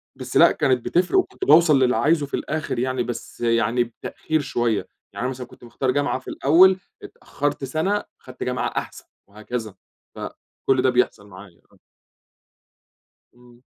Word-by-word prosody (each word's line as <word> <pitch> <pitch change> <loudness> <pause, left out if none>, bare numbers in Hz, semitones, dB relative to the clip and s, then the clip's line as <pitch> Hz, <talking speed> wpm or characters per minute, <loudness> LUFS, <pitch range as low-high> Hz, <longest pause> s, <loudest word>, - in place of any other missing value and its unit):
بس - - -3
لأ، - - +7
كانت 130 -3 0
بتفرق 180 - +1
وكنت 380 +1 -3
باوصل 165 - +6
للي 130 -1 +3
عايزه 155 0 +2
في 140 - -18
الآخر 155 -4 -3
يعني، 130 0 -1
بس 120 0 -7
يعني 115 0 +2
بتأخير 155 +6 -4
شويّة. 120 -5 -1 0.3
يعني - - -6
أنا - - 0
مثلًا 125 -1 -7
كنت - - -18
مختار 130 +2 -2
جامعة 140 -1 0
في 130 - -22
الأوّل، 185 +6 +5 0.2
اتأخرت 145 -1 -4
سنة، 160 +10 -1 0.2
أخدت 130 0 -8
جامعة 125 -1 -1
أحسن - - -5 0.2
وهكذا، 110 0 -6 0.4
فكل 135 -1 -3
ده 130 - +3
بيحصل 125 -4 0
معايا 95 -3 -14
آه. - - -24 1.6
إمم. 120 0 -20
130 Hz, 155 wpm, -22 LUFS, 120-145 Hz, 1.6 s, لأ